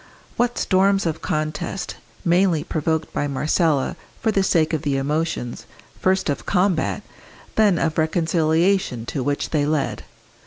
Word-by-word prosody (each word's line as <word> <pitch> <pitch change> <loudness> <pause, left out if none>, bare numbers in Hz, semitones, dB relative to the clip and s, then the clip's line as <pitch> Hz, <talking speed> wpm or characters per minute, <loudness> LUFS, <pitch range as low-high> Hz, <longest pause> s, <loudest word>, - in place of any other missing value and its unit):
What 245 0 0
storms 195 +1 +2
of 160 -1 -2
contest, 155 +4 -3 0.3
mainly 175 -2 +3
provoked 160 0 -2
by 145 - -1
Marcella 150 +1 +1 0.2
for 220 - +1
the 200 - +2
sake 165 -4 +2
of 155 - 0
the 145 -3 0
emotions, 145 -3 -2 0.3
first 190 0 +1
of 145 - -2
combat, 180 -3 +1 0.5
then 210 -5 +4
of 160 -1 0
reconciliation 160 -3 +1
to 135 - -3
which 145 +2 -1
they 150 -3 +2
led! 150 -1 -1
160 Hz, 140 wpm, -22 LUFS, 150-185 Hz, 0.5 s, then